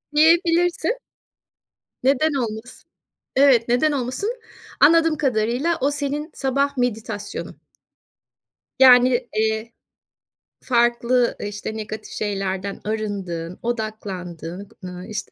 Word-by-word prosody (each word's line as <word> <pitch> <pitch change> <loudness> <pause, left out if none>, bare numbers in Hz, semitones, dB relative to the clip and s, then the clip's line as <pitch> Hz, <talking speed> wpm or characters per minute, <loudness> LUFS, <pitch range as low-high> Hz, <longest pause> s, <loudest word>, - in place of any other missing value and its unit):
Diyebilirsin. 340 +7 +3 1.0
Neden 285 +4 +3
olmasın? 235 -2 -5 0.5
Evet. 260 -4 +5
Neden 260 +6 +3
olmasın? 285 - -2 0.4
Anladığım 325 +1 +5
kadarıyla, 255 +4 0
o 275 - +2
senin 290 +2 -3
sabah 275 +1 0
meditasyonun. 245 -3 -3 1.2
Yani, 250 -1 +6
eee, 220 +1 0 0.9
farklı, 240 0 +2
ııı, 205 - -3
işte, 205 +2 -6
negatif 215 0 -7
şeylerden 195 -1 -3
arındığın, 195 -6 -4
odaklandığın, 200 -6 -5 0.2
ııı, 180 0 -7
işte, 215 -1 -5
240 Hz, 90 wpm, -22 LUFS, 215-280 Hz, 1.2 s, Yani